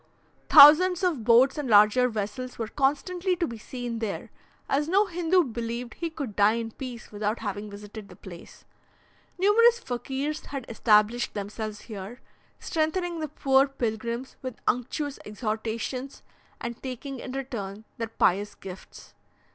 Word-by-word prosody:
Thousands 350 +6 +8
of 325 -10 0
boats 245 +5 +5
and 280 -4 -3
larger 210 +4 +6
vessels 225 +4 -5
were 225 - -3
constantly 345 - 0
to 350 -1 0
be 235 -7 -7
seen 240 0 -5
there, 220 -3 -4 0.4
as 295 +3 0
no 395 +4 +4
Hindoo 355 0 +2
believed 235 -1 -5
he 335 0 -4
could 280 -10 -6
die 205 +1 +4
in 230 -1 -4
peace 245 -1 -8
without 210 +2 -2
having 205 -1 -5
visited 205 +1 -10
the 180 - -13
place. 175 -2 -13 0.7
Numerous 455 +5 +5
Fakirs 275 - -4
had 275 -3 -5
established 220 +1 +2
themselves 210 +1 -5
here, 215 +2 -8 0.4
strengthening 335 +2 -1
the 310 - -2
poor 270 -1 +3
pilgrims 235 -1 -4
with 255 -3 -6
unctuous 275 +4 -1
exhortations, 225 +4 -4 0.4
and 235 0 -6
taking 265 +1 -6
in 255 - -7
return 220 -7 -5 0.2
their 230 - -2
pious 205 -1 +1
gifts. 190 -1 -11
245 Hz, 140 wpm, -27 LUFS, 215-290 Hz, 0.7 s, Thousands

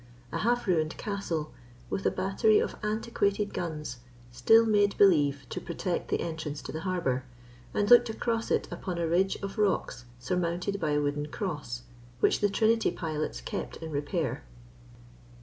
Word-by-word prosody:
A - - -2
half 240 +1 +1
ruined 160 -4 +1
castle, 175 -7 -3 0.4
with 195 - 0
a - - +5
battery 195 +3 +2
of - - 0
antiquated 210 -1 0
guns, 150 -7 -4 0.3
still 225 - +5
made 205 -2 +3
believe 145 -8 +4
to - - -4
protect 180 -2 -3
the - - 0
entrance 160 -3 -4
to - - -6
the 160 - -4
harbour, 170 -9 -1 0.5
and 205 - 0
looked 240 +1 +7
across 230 0 -1
it - - +1
upon 180 -3 -4
a 170 - 0
ridge 185 +4 +2
of 195 +2 -5
rocks 190 -11 0
surmounted 180 +8 -1
by 155 -4 0
a 145 - +3
wooden 145 +1 -1
cross, 145 - -4 0.4
which - - +3
the 205 - +3
Trinity 220 +2 +3
pilots 155 - -3
kept - - -5
in 160 -1 -7
repair. 150 +2 -2
180 Hz, 160 wpm, -29 LUFS, 150-205 Hz, 0.5 s, looked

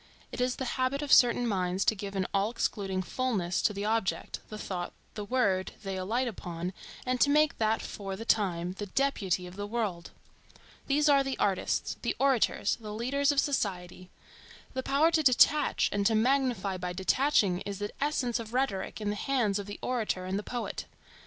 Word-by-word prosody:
It - - -4
is 250 0 +1
the 260 - -4 0.2
habit 275 +3 0
of 290 - +2
certain 245 0 +6
minds 185 -2 0
to - - +4
give 200 -1 -6
an 190 -1 0
all 200 +1 +2
excluding 195 -5 -2
fulness 195 -6 -1
to - - +2
the 200 0 -4
object, 220 -2 -1
the 215 - -6
thought, 180 -4 -4 0.2
the 210 - -5
word, 200 -5 0
they 195 -1 -3
alight 220 +8 -1
upon, 180 -4 -5 0.3
and 255 -1 -1
to 285 - +5
make 300 +1 +3
that 220 0 +1
for 195 -2 -5
the 225 +4 -7
time 180 -6 +1
the 205 - -4
deputy 195 -7 0
of 180 +1 -10
the 205 0 -4
world. 205 -6 -3 0.8
These 290 +2 +3
are 280 -2 +5
the 270 -1 -3
artists, 195 -2 0
the - - -1
orators, 265 -6 +2
the 210 -2 -7
leaders 275 +5 +1
of 285 - +2
society. 185 -10 -2 0.6
The 260 - -2
power 290 +5 +3
to 320 - +3
detach 290 +2 +4
and 205 0 0
to 225 - +2
magnify 235 -5 +1
by 180 0 -4
detaching 190 -1 +2
is 200 0 -5
the 205 +1 -4
essence 255 -5 0
of 230 +1 -7
rhetoric 225 -9 -1
in 205 -1 -1
the - - -3
hands 220 -5 0
of 200 - -6
the 205 - -6
orator 220 -7 -1
and 190 +2 -1
the - - -3
poet. 240 +2 -4
215 Hz, 190 wpm, -29 LUFS, 190-255 Hz, 0.8 s, certain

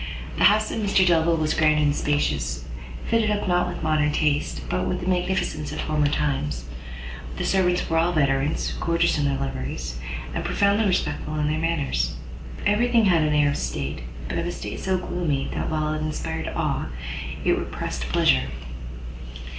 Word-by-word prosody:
The - - +6
house 215 +1 +5
of - - -2
Mr 200 -3 +3
Delvile 165 -1 +4
was 155 -1 +1
grand 155 -1 +4
and 145 -1 +3
spacious, 65 - 0 0.4
fitted 225 -2 +2
up 205 -1 0
not 180 -1 +2
with 175 -1 -5
modern 155 -1 +2
taste, 150 - 0
but 90 +8 -1
with 95 - -1
the - - -4
magnificence 180 -4 0
of - - -5
former 150 -1 +1
times; 135 - -1 0.7
the - - -2
servants 180 -2 +2
were 165 0 +2
all 170 +2 +3
veterans, 140 -2 +1
gorgeous 170 -2 +2
in 145 - +1
their 140 -1 +1
liveries, 65 - -4 0.3
and - - -2
profoundly 205 +2 +2
respectful 180 -4 -1
in 150 -1 0
their 155 - 0
manners; 145 - 0 0.5
every 210 +4 +3
thing 230 -2 +5
had 175 -4 +4
an 150 -1 +2
air 145 -1 +4
of - - -2
state, 70 +3 -3 0.3
but - - -2
of 170 - -2
a - - -1
state - - -6
so 190 -1 0
gloomy, 170 -6 -2
that - - -2
while 155 -1 0
it 155 - -3
inspired 160 +1 -3
awe, 150 - -1 0.6
it - - +4
repressed - - -4
pleasure. 65 +1 +3
155 Hz, 180 wpm, -24 LUFS, 140-180 Hz, 0.7 s, The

